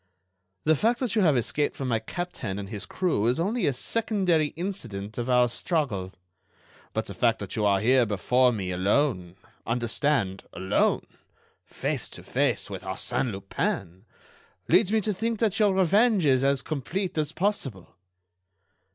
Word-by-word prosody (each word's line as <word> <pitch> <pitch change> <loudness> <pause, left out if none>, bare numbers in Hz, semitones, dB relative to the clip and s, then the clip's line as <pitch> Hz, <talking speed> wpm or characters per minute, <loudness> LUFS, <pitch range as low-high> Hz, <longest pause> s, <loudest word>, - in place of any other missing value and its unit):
"The 155 +1 +4
fact 235 - +1
that 245 -4 -1
you 215 - +3
have 155 -8 +4
escaped 145 +5 0
from 135 - -4
my 115 -3 +1
captain 115 - -5
and 100 -1 -6
his 105 -1 -4
crew 170 - 0
is 125 +6 +1
only 210 +7 0
a - - +3
secondary 185 - +1
incident 120 - -5
of 120 +1 -3
our 125 -1 +5
struggle. 115 - -2 0.8
But - - -2
the - - -6
fact - - +2
that - - -6
you 105 -1 +1
are 100 -1 +3
here 125 +3 +3
before 125 +5 +3
me 95 -5 -3
alone—understand, 100 - -1
alone—face 95 - -3
to - - -10
face - - 0
with - - -6
Arsène 125 - -1
Lupin, 95 -1 -3 0.6
leads 185 +3 +4
me 220 0 +3
to 210 +1 -1
think 225 +4 -2
that 220 -1 0
your 205 -3 +3
revenge 200 +1 +3
is 130 -2 +3
as 140 -1 +2
complete 165 - -3
as 150 -1 -1
possible." 145 - -2
135 Hz, 150 wpm, -26 LUFS, -, 0.8 s, our